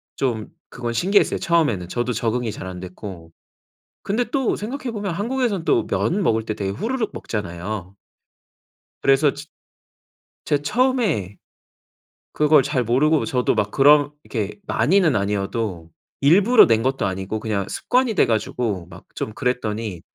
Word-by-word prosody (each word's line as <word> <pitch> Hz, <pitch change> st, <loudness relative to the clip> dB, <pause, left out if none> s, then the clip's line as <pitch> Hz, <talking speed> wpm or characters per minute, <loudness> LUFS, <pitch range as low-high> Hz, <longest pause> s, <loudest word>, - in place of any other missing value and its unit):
좀 115 Hz, -5 st, -2 dB, 0.2 s
그건 120 Hz, -1 st, -4 dB
신기했어요 190 Hz, -, +2 dB
처음에는. 145 Hz, -, +1 dB
저도 120 Hz, +5 st, -2 dB
적응이 115 Hz, +1 st, -1 dB
잘 95 Hz, -, -7 dB
안 90 Hz, -1 st, -7 dB
됐고. 90 Hz, -2 st, -9 dB, 0.7 s
근데 215 Hz, +5 st, 0 dB
또 270 Hz, -3 st, 0 dB
생각해보면 225 Hz, -3 st, -4 dB
한국에서는 215 Hz, -2 st, -1 dB
또 -, -, +2 dB
면 195 Hz, +5 st, 0 dB
먹을 115 Hz, -, +1 dB
때 110 Hz, -, -2 dB
되게 100 Hz, -2 st, -3 dB
후루룩 225 Hz, -, -2 dB
먹잖아요. 100 Hz, -1 st, -5 dB, 1.1 s
그래서 135 Hz, +1 st, +4 dB
츠 145 Hz, +1 st, -9 dB, 1.0 s
제가 145 Hz, -1 st, +1 dB
처음에 210 Hz, -, 0 dB, 1.0 s
그걸 150 Hz, -2 st, +4 dB
잘 140 Hz, -3 st, 0 dB
모르고 140 Hz, +7 st, +2 dB
저도 125 Hz, -5 st, +1 dB
막 100 Hz, -, 0 dB
그렇게 145 Hz, -6 st, +2 dB
많이는 175 Hz, -4 st, +3 dB
아니어도 100 Hz, -3 st, -2 dB, 0.3 s
일부러 200 Hz, -, +6 dB
낸 115 Hz, -1 st, +2 dB
것도 130 Hz, -1 st, 0 dB
아니고 95 Hz, +3 st, -3 dB
그냥 105 Hz, -3 st, -2 dB
습관이 250 Hz, -3 st, 0 dB
돼 -, -, +4 dB
가지고 110 Hz, -4 st, -1 dB
막 90 Hz, 0 st, -13 dB
좀 110 Hz, -, -4 dB
그랬더니 110 Hz, -7 st, -2 dB
125 Hz, 300 characters per minute, -22 LUFS, 105-170 Hz, 1.1 s, 일부러